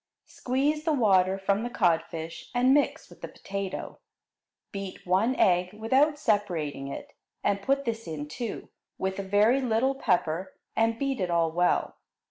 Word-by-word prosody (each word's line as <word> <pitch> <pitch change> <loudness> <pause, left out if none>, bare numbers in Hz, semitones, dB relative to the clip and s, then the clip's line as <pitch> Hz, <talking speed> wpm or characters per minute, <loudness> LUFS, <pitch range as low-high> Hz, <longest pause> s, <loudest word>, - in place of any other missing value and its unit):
Squeeze 285 +4 -1
the 315 -1 +1
water 195 -7 +3
from 195 +1 0
the 240 - -3
codfish 165 -5 -1
and 250 +2 +4
mix 290 0 +1
with - - -17
the - - -5
potato. 195 -1 -6 0.7
Beat 195 -2 -7
one 195 +8 +2
egg 180 -2 +2
without 265 +8 +2
separating 175 - -1
it, 140 - -8 0.3
and 200 0 +1
put 275 +5 0
this 230 -3 -3
in, 150 -2 -5
too, 230 +9 -6 0.3
with 190 +1 -2
a - - 0
very 210 +7 +3
little 250 +2 +1
pepper, 185 - -1 0.2
and 225 0 +2
beat 275 0 -1
it 180 - 0
all 165 -1 +2
well. 175 +2 +1
205 Hz, 155 wpm, -27 LUFS, 180-250 Hz, 0.7 s, and